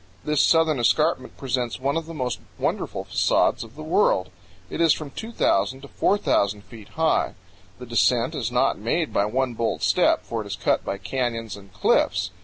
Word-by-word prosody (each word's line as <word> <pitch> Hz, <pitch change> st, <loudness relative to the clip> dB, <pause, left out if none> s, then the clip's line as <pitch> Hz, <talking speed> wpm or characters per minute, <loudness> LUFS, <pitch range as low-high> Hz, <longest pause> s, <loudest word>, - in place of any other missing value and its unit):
This 150 Hz, -1 st, +2 dB
southern 160 Hz, -4 st, +3 dB
escarpment 130 Hz, +2 st, +1 dB
presents 125 Hz, -3 st, -2 dB
one 140 Hz, +3 st, -1 dB
of 165 Hz, -1 st, -2 dB
the 165 Hz, -, -7 dB
most 125 Hz, -6 st, -2 dB, 0.2 s
wonderful -, -, -2 dB
facades -, -, +1 dB
of 115 Hz, +1 st, -14 dB
the 155 Hz, -, -8 dB
world. 155 Hz, -, +2 dB, 0.4 s
It -, -, -4 dB
is 165 Hz, -2 st, +5 dB
from 150 Hz, -3 st, -7 dB
2,000 130 Hz, -, 0 dB
to 140 Hz, -, -10 dB
4,000 105 Hz, -, +1 dB
feet 110 Hz, -2 st, -13 dB
high. 160 Hz, 0 st, +1 dB, 0.4 s
The 125 Hz, -, -9 dB
descent 120 Hz, +1 st, +2 dB
is 115 Hz, -1 st, -3 dB
not 125 Hz, -1 st, +1 dB
made 155 Hz, +10 st, -1 dB
by 100 Hz, -, +2 dB
one 125 Hz, +3 st, -1 dB
bold 115 Hz, 0 st, -2 dB
step, -, -, +3 dB
for -, -, -4 dB
it -, -, -8 dB
is -, -, -4 dB
cut -, -, 0 dB
by 100 Hz, -, -3 dB
canyons 115 Hz, +1 st, -3 dB
and 100 Hz, -1 st, -14 dB
cliffs. 95 Hz, 0 st, +1 dB
125 Hz, 185 wpm, -24 LUFS, 110-150 Hz, 0.4 s, is